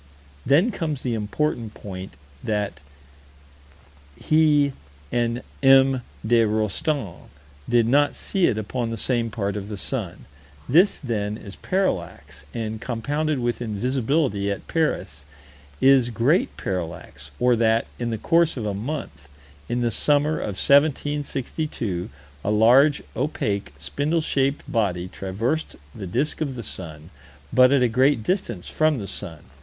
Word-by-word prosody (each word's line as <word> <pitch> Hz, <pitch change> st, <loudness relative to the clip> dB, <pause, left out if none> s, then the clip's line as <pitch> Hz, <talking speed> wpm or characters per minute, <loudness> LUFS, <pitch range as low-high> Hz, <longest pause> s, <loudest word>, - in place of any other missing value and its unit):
Then 165 Hz, -, +4 dB
comes 155 Hz, -, -3 dB
the 125 Hz, -, -1 dB
important 115 Hz, +1 st, -2 dB
point: 95 Hz, -2 st, -8 dB, 0.3 s
that 105 Hz, -2 st, -2 dB, 1.4 s
he 150 Hz, -3 st, +3 dB, 0.4 s
and 120 Hz, 0 st, 0 dB, 0.2 s
M. 135 Hz, -1 st, +6 dB, 0.2 s
de 115 Hz, +1 st, +4 dB
Rostan 110 Hz, -, -2 dB, 0.4 s
did 120 Hz, -1 st, +4 dB
not 145 Hz, +4 st, +3 dB
see 190 Hz, -3 st, +1 dB
it 110 Hz, -, 0 dB
upon 115 Hz, +2 st, -2 dB
the 115 Hz, -, -4 dB
same 120 Hz, 0 st, 0 dB
part 100 Hz, -3 st, -2 dB
of 100 Hz, 0 st, -5 dB
the 105 Hz, -, -5 dB
sun. 100 Hz, -5 st, -3 dB, 0.4 s
This, 175 Hz, +9 st, +4 dB
then, 105 Hz, -5 st, -3 dB
is 100 Hz, -3 st, -10 dB
parallax, 185 Hz, -, -3 dB
and, 110 Hz, -1 st, -4 dB
compounded 145 Hz, +6 st, -1 dB
with 120 Hz, -1 st, -2 dB
invisibility 120 Hz, 0 st, 0 dB
at 100 Hz, -, -4 dB
Paris, 150 Hz, -, -1 dB, 0.6 s
is 130 Hz, -2 st, +5 dB
great 120 Hz, +9 st, +1 dB
parallax 80 Hz, -6 st, -5 dB
or 125 Hz, 0 st, +4 dB
that, 115 Hz, 0 st, +2 dB
in 120 Hz, -1 st, -2 dB
the 115 Hz, -, -2 dB
course 165 Hz, +3 st, +2 dB
of 115 Hz, -, -3 dB
a 105 Hz, -, -1 dB
month, 105 Hz, -, -5 dB, 0.4 s
in 120 Hz, -, 0 dB
the 120 Hz, -1 st, +1 dB
summer 150 Hz, +7 st, +2 dB
of 100 Hz, -, -3 dB
1762, 140 Hz, -, 0 dB, 0.3 s
a -, -, -1 dB
large, 125 Hz, +7 st, +5 dB
opaque, 105 Hz, -, -2 dB
spindle 145 Hz, -, -1 dB
shaped 140 Hz, -2 st, 0 dB
body 90 Hz, -6 st, 0 dB
traversed 100 Hz, -, -3 dB, 0.2 s
the 100 Hz, -, -7 dB
disk 145 Hz, -, -1 dB
of 140 Hz, -4 st, -2 dB
the 120 Hz, -, -6 dB
sun, 80 Hz, -5 st, -8 dB, 0.4 s
but 130 Hz, 0 st, +6 dB
at 140 Hz, -2 st, +4 dB
a -, -, +5 dB
great 130 Hz, +1 st, +2 dB
distance 180 Hz, -, -2 dB
from 155 Hz, -2 st, +2 dB
the 105 Hz, -, -5 dB
sun. 85 Hz, -5 st, -5 dB
120 Hz, 140 wpm, -24 LUFS, 105-145 Hz, 1.4 s, M